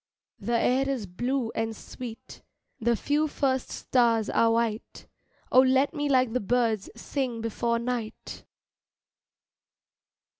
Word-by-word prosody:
The 235 -1 0
air 265 +3 +2
is 255 -6 -2
blue 240 +6 -2
and 225 0 -2
sweet, 230 +1 -9 0.4
The 235 0 +2
few 295 +6 +1
first 265 -3 -1
stars 230 -4 +1
are 230 - +4
white, 230 -1 -2 0.5
Oh 255 - +7
let 265 +3 +3
me 290 -2 -1
like 255 -4 +3
the 250 - +1
birds 225 -2 0
Sing 245 0 -3
before 235 +1 -1
night. 235 -2 -4
240 Hz, 120 wpm, -27 LUFS, 225-260 Hz, 0.5 s, Oh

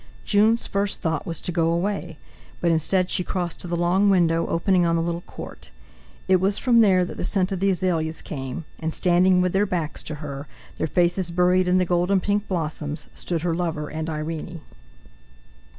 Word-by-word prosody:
Jun's 220 +3 +3
first 200 0 -1
thought 160 -2 -2
was 165 -2 -3
to - - -2
go 165 -1 +1
away, 170 -2 -2 0.4
but 170 - +2
instead 180 +3 +1
she 180 - +1
crossed 175 -2 -3
to - - -7
the 175 - -2
long 180 +4 +3
window 165 -3 +3
opening 180 +2 +2
on 170 -1 +2
the 165 - +1
little 170 0 -2
court. - - -10 0.6
It 185 - +5
was 195 +2 0
from 240 -3 +3
there 190 -5 +5
that - - -8
the - - -3
scent 185 +1 0
of 190 - -2
the 195 +1 +2
azaleas 165 -4 -1
came, 135 +2 -6
and, 160 0 -3
standing 180 +1 +3
with 180 -1 0
their 200 +2 +2
backs 170 -5 -2
to 155 - -4
her, 145 -1 -7 0.3
their - - -1
faces 175 +2 +1
buried 180 +1 +2
in 180 +1 +3
the 185 - +2
golden 180 +3 +2
pink 205 +2 -1
blossoms, 155 -4 -3
stood 165 -3 -3
her 175 -2 0
lover 165 -3 -2
and 160 +1 -4
Irene. 160 +1 -5
175 Hz, 195 wpm, -24 LUFS, 165-185 Hz, 0.6 s, It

